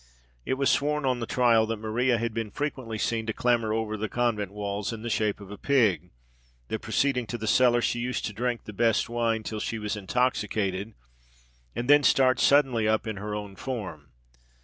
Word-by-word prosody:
It - - +1
was 140 0 +2
sworn 150 0 0
on 130 -2 +1
the 115 - -4
trial 115 -3 +3
that 115 0 -2
Maria 115 +3 +1
had 115 0 -2
been 115 -1 -3
frequently 130 -3 -4
seen 110 +1 -1
to 110 - -1
clamber 120 -2 +1
over 110 -1 -1
the 110 0 -3
convent 115 -5 -1
walls 100 0 -3
in 115 -1 -7
the 120 - -3
shape 105 -2 0
of 100 -1 -11
a 105 - -9
pig 105 - +2 0.6
that, - - -2
proceeding 125 -4 0
to 120 - -4
the 110 - -5
cellar, 120 +1 +4
she 120 - 0
used 125 +1 -2
to 105 - -4
drink 120 +2 -2
the 105 - -9
best 115 +1 +1
wine 115 -2 0
till 110 0 -4
she 110 - -3
was 105 0 -3
intoxicated; 105 -2 -1 0.8
and 120 - -3
then 145 +1 +7
start 130 -2 +4
suddenly 130 -6 +4
up 110 0 +1
in 110 -2 -4
her 105 +1 -4
own 105 -2 -6
form. 95 - -6
115 Hz, 200 wpm, -27 LUFS, 105-125 Hz, 0.8 s, then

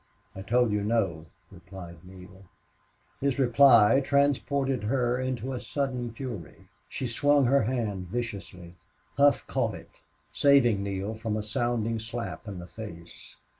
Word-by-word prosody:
"I 95 - -7
told 120 +3 +2
you 105 -1 0
no," 95 -8 -1 0.2
replied 90 -3 -11
Neale. 95 +1 -14 0.7
His 140 -1 0
reply 125 -2 +6
transported 140 -3 +1
her 125 +1 0
into 130 0 -3
a 125 - -3
sudden 125 0 -3
fury. 115 - -8 0.2
She 130 - -4
swung 145 +4 +3
her 135 -2 +3
hand 105 -7 -2
viciously. 100 -5 -6 0.4
Hough 140 0 +4
caught - - -1
it, - - -15 0.3
saving 130 -8 +4
Neale 100 +1 -3
from 110 -1 -3
a 105 - -3
sounding 115 0 -1
slap 115 +1 -6
in 100 -2 -6
the 90 - -8
face. 85 -3 -11
115 Hz, 135 wpm, -27 LUFS, 100-130 Hz, 0.7 s, reply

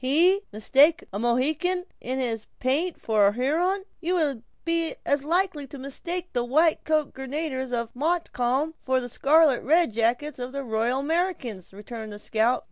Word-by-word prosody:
"He 345 +9 +4
mistake 275 +9 +4
a 200 - -2
Mohican 300 +10 +1
in 255 +2 -3
his 230 -4 -2
paint 300 +7 0
for 215 -3 +3
a 200 - +2
Huron! 335 - 0 0.2
You 355 +2 -1
would 290 -9 0 0.2
be 335 -1 0
as 285 -1 +1
likely 330 -2 0
to 280 - -9
mistake 340 +7 -5
the 245 - +1
white 310 +6 +2
coated 310 -2 +1
grenadiers 265 -1 -4
of 235 -1 -3
Montcalm 295 -2 0
for 260 0 +1
the 245 - -5
scarlet 285 +2 +3 0.3
jackets 240 +7 0
of 250 +1 -5
the 280 0 -3
Royal 235 +2 0
Americans," 300 - -2
returned 215 +2 -8
the 205 - -7
scout. 225 +3 +1
270 Hz, 160 wpm, -26 LUFS, 240-325 Hz, 0.3 s, He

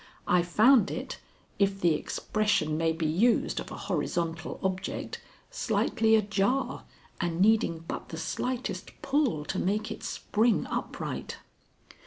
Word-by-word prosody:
I 180 0 +4
found 210 +6 +5
it, - - -5 0.4
if 195 -1 +2
the 175 -3 +4
expression 155 -1 0
may 165 +1 +2
be 160 0 -2
used 195 +10 +2
of - - -6
a - - -7
horizontal 165 -1 -2
object, 190 0 -3 0.3
slightly 225 - +2
ajar 210 +5 0 0.3
and 175 -2 -1
needing 190 -5 +3
but - - -5
the 160 - -6
slightest 215 +1 -3
pull 270 - +1
to 185 - -2
make 210 +3 0
it - - -6
spring 220 +2 +1
upright. - - -4
195 Hz, 130 wpm, -29 LUFS, 165-220 Hz, 0.4 s, found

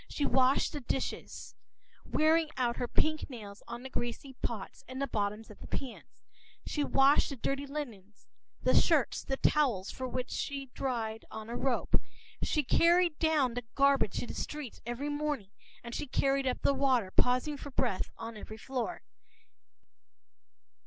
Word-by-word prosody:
She 290 - -1
washed 260 +1 +3
the 295 - -3
dishes, 260 +2 -3 0.5
wearing 315 +1 +3
out 240 -2 +1
her 245 - -1
pink 310 +5 +1
nails 210 -5 -9
on 240 - -6
the 265 - -6
greasy 240 +3 -3
pots 215 -5 -4
and 260 +1 -6
the 275 - +1
bottoms 210 -2 -2
of 210 - -14
the - - -10
pans. 265 -3 -6 0.4
She 295 - 0
washed 275 0 +5
the 280 - -4
dirty 275 +3 -2
linen, 230 -9 -6 0.5
the - - +4
shirts - - +4
and - - -24
the 270 - +1
towels, 250 -13 +2
which 255 -1 -3
she 275 -2 -3
dried 225 -4 -2
on 220 +1 -7
a - - -3
rope; 260 0 +1 0.4
she 300 - +1
carried 340 +3 +4
down 305 -6 +3
the 245 - -2
garbage 275 -7 +4
to - - -1
the - - -6
street 295 -6 -5
every 250 +5 -2
morning, 290 -9 -2 0.3
and 235 0 -7
she 295 - -3
carried 275 +1 +2
up 255 - -1
the - - +4
water, 260 -8 +2
pausing 255 +7 +2
for 285 - -7
breath 245 -7 0
on 225 0 -6
every 215 +1 -8
floor. 260 +7 -3
260 Hz, 165 wpm, -32 LUFS, 235-285 Hz, 0.5 s, washed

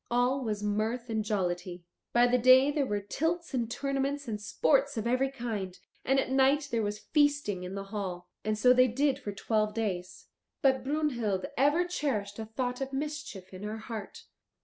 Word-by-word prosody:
All 250 +3 +2
was 210 -3 -2
mirth 220 +4 -1
and 220 -1 0
jollity. 180 -3 -2 0.3
By 240 0 +5
the 245 0 +3
day 255 +3 +7
there 290 -2 0
were 205 0 -1
tilts 325 - -2
and 235 -3 -1
tournaments 275 +2 -2
and 210 -2 -3
sports 275 +5 +2
of 220 - -2
every 255 +3 +2
kind, 220 -8 -4 0.3
and 270 +1 +3
at 260 - -1
night 275 +2 +3
there 230 -1 +1
was 205 0 -2
feasting 290 - +1
in 180 +1 -6
the 195 - -4
hall. 180 -4 -4 0.2
And 215 0 0
so 250 +3 +6
they 255 0 +5
did 270 +3 +1
for 210 - -5
twelve 215 +1 0
days. 185 -5 -3 0.4
But 265 -2 +3
Brunhild 250 -10 0
ever 290 +7 +3
cherished 230 - -2
a 220 - -4
thought 245 +3 -3
of 270 0 -3
mischief 285 -10 -5
in 185 - -8
her 210 +1 -4
heart. 220 -2 -7
240 Hz, 185 wpm, -30 LUFS, 210-275 Hz, 0.4 s, day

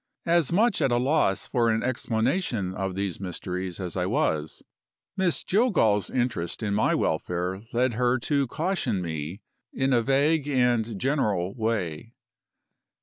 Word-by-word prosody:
As 170 -4 +2
much 215 +4 +3
at 135 - +2
a 120 - +3
loss 130 -6 +1
for 120 -3 +1
an 110 0 +1
explanation 120 - -1
of 95 -1 -3
these 100 -2 -3
mysteries 90 -1 -5
as 90 -3 -4
I - - 0
was, 75 0 -1 0.5
Miss 185 -3 0
Jillgall's 175 - +2
interest 120 -7 -2
in 105 -2 0
my 105 +1 +2
welfare 90 +2 -1
led 125 +1 +1
her 125 +2 +2
to 140 -1 +1
caution 155 - -1
me 80 +4 -5 0.3
in 135 0 0
a 120 - +4
vague 140 +4 +2
and 120 -6 +1
general 105 -9 0
way. 110 -3 -3
115 Hz, 145 wpm, -26 LUFS, 95-135 Hz, 0.5 s, a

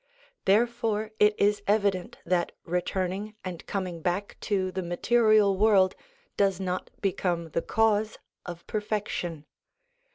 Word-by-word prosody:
Therefore 220 0 +1
it 210 0 +4
is 205 0 +3
evident 200 -3 +1
that 175 0 0
returning 185 +4 -2
and 180 -3 -6
coming 180 -4 -3
back 180 +4 -2
to 190 -3 0
the 190 - -3
material 210 +3 +3
world 195 -2 +4 0.4
does 195 -2 +2
not 185 -1 -3
become 175 -4 -1
the 165 - 0
cause 220 +1 +1 0.3
of 175 -1 -8
perfection. 205 -7 -3
195 Hz, 120 wpm, -27 LUFS, 180-210 Hz, 0.4 s, it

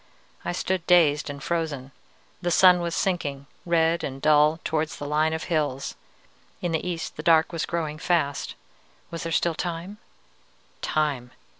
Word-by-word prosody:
"I - - -2
stood 185 0 -2
dazed 155 -5 +4
and 140 -1 -7
frozen. 155 -6 -2 0.5
The 175 - 0
sun 180 +1 +6
was 170 -1 -2
sinking, 145 -7 -1 0.2
red 165 0 +2
and 135 -1 -4
dull, 150 +2 +4
towards 155 0 -1
the 145 - -6
line 155 +2 +1
of 160 0 -3
hills. 145 -5 -1 0.6
In 175 - -2
the 160 - -1
east 175 -2 -4
the - - -4
dark 160 0 +4
was 165 - -2
growing 155 -2 -3
fast. 160 -5 0 0.6
Was 165 - -5
there 165 - -4
still 170 +1 +2
time? 175 +5 -5 0.8
_Time! 145 -5 -1
160 Hz, 155 wpm, -25 LUFS, 150-170 Hz, 0.8 s, sun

